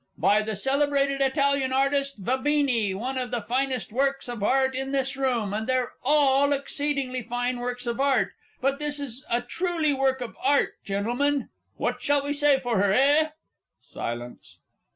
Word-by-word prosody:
_"), - - -23
by 210 +1 +4
the 215 0 -3
celebrated 275 +3 +1
Italian 275 -1 +2
artist 275 0 +1
Vabene, 260 -6 +1
one 260 +5 -3
of 250 -1 -3
the 240 -1 -1
finest 255 +2 -1
works 275 +1 0
of 240 -3 -5
Art 265 +5 +2
in 270 +1 -3
this 270 0 0
room, 245 -7 0
and 220 +1 -3
they're 255 -1 0
all 285 0 +4
exceedingly 280 -2 -2
fine 245 +1 -2
works 245 0 -4
of 235 +1 -3
Art; 265 -8 +2 0.3
but 275 +2 0
this 295 -1 -2
is 270 -1 -5
a 235 +1 +1
truly 325 +3 0
work 265 -1 +1
of 245 -2 -6
Art, 280 +2 +2
Gentlemen. 245 +9 -1 0.3
What - - -2
shall 285 -1 +2
we 285 0 -1
say 290 -1 +4
for 245 -6 -1
her, 200 -1 +3
eh? 290 +7 +4 0.5
(_Silence. 120 +1 -7
265 Hz, 170 wpm, -26 LUFS, 245-280 Hz, 0.5 s, by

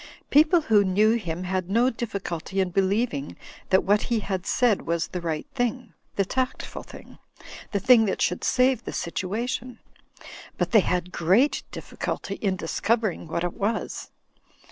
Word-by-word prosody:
People 310 +4 +5
who 215 -7 +4
knew 205 +3 +3
him 175 -6 -3
had 185 0 -2
no 235 +5 +3
difficulty 195 -5 -4
in 185 -2 +1
believing 195 - 0 0.3
that 190 - +4
what 205 +2 +3
he 230 -3 +1
had 190 -2 -3
said 240 -5 +2
was 170 0 0
the 180 - -4
right 165 - -3
thing, 245 -1 -2 0.2
the 195 - +1
tactful 255 +5 -3
thing, - - -13 0.5
the 200 - 0
thing 230 +2 +6
that 195 - -1
should 180 - 0
save 255 -1 +2
the - - -6
situa 190 +7 -3
tion; 255 -1 -4 0.8
but - - -1
they 225 - +7
had 180 -1 -1
great 190 - +2
difficulty - - -5
in 195 -3 0
discovering 215 +2 -1
what 170 +2 -2
it 175 - -2
was. 215 +3 -3
200 Hz, 160 wpm, -25 LUFS, 180-240 Hz, 0.8 s, they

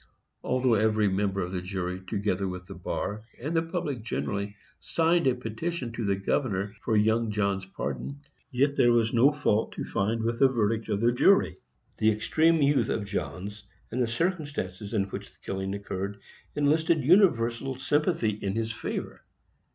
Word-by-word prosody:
Although 130 -1 +2
every 110 0 +3
member 95 0 0
of 90 - -5
the 90 -1 -2
jury, 90 -1 -3
together 100 -1 -1
with 90 0 -6
the - - -9
bar, 105 +1 -4 0.2
and 150 +7 -3
the 165 - +4
public 150 -6 -3
generally, 100 -2 -3 0.2
signed 165 -1 +2
a 130 - +3
petition 125 +4 -4
to 115 0 -4
the 100 -1 +1
governor 100 0 -1
for 110 -2 +2
young 110 +2 +2
Johns' 100 -2 -1
pardon, 140 +7 -4 0.3
yet 140 +2 +1
there 120 - +5
was 115 -1 +2
no 125 +5 +6
fault 115 -7 0
to - - -4
find 110 +3 -1
with 115 +1 -1
the 135 - +7
verdict 115 -3 0
of 105 -1 0
the 120 +1 +4
jury. 120 - +4 0.4
The 110 - +4
extreme 155 +9 +3
youth 140 0 +3
of 105 - -1
Johns, 100 +2 -4 0.3
and 125 +3 -1
the 120 - +2
circumstances 140 - -2
in 100 - +3
which 95 - -7
the - - -28
killing 95 0 -3
occurred, 100 0 -4 0.4
enlisted 155 +1 +2
universal 135 - +3
sympathy 145 -2 +1
in 100 -1 -3
his 115 0 -1
favor. 110 - -5
110 Hz, 170 wpm, -28 LUFS, 100-135 Hz, 0.4 s, the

